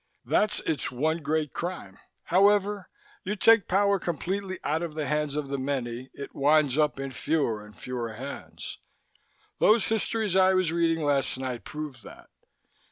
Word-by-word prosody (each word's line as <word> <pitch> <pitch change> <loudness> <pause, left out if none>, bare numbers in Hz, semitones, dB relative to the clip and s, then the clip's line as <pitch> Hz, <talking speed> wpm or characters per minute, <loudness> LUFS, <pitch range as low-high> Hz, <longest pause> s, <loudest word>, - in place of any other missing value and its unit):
"That's 210 0 +2
its 155 -5 -1
one 155 +6 0
great 150 0 -1
crime. 170 - -5 0.3
Whenever 200 +1 +3 0.3
you 205 +3 -2
take 225 -1 +5
power 200 +1 +3
completely 185 +3 -3
out 155 +3 0
of 165 -3 -4
the 155 -2 -2
hands 150 -1 -1
of 150 -2 -3
the 140 -1 -2
many, 130 -2 -3
it 140 - -8
winds 145 -1 +3
up 150 -2 +1
in 135 0 -4
fewer 120 -5 -1
and 105 0 -15
fewer 120 -3 -4
hands. 135 +6 -8 0.8
Those 215 +1 +4
histories 220 -2 0
I 190 0 +5
was 185 -3 +2
reading 165 -1 +1
last 140 -3 +1
night 130 -2 -4
prove 150 -3 -6
that. - - -14
155 Hz, 160 wpm, -27 LUFS, 135-185 Hz, 0.8 s, take